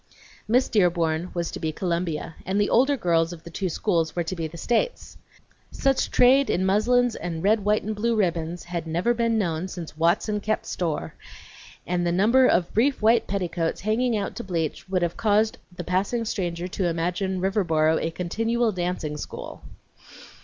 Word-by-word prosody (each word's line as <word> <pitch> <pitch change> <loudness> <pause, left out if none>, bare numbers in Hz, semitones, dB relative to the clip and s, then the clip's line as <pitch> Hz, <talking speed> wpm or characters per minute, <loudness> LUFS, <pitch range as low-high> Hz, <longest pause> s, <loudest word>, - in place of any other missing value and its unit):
Miss 250 +4 +3
Dearborn 175 -4 +1
was 170 -1 -2
to - - -6
be 160 - -2
Columbia 170 -1 -2
and 190 +3 -1
the 205 - +1
older 270 +4 +4
girls 165 -5 +1
of 160 - -12
the 170 - -10
two 185 +2 -2
schools 165 -2 0
were 175 - 0
to 175 +3 -4
be 165 -2 -3
the 165 +2 -11
States. 240 - -1 0.5
Such 270 -1 0
trade 265 +2 +5
in 185 - +1
muslins 235 +5 +2
and 165 -1 -5
red, 210 +1 +3
white, 210 +1 +2
and 215 +1 -3
blue 230 +2 0
ribbons 170 -4 -1
had 170 -2 -5
never 175 +9 +1
been 230 -1 +1
known 175 -3 -1
since 170 -4 -8
"Watson 175 +6 +1
kep' 215 +1 -2
store," 155 - -3 0.7
and 175 0 -1
the 175 - +1
number 230 +9 +4
of 175 -1 +1
brief 265 +5 +2
white 225 +1 +3
petticoats 175 -4 -2
hanging 225 +3 +1
out 200 - -3
to 240 - -4
bleach 170 -1 -3
would 185 -2 +1
have 170 -1 -2
caused 215 0 +2
the 175 0 -7
passing 195 +7 -1
stranger 175 -5 -3
to 185 0 -2
imagine 180 +3 -1
Riverboro 165 -5 +2
a 165 - -1
continual 225 +7 0
dancing 175 -5 -3
school. - - -8
185 Hz, 180 wpm, -25 LUFS, 170-220 Hz, 0.7 s, trade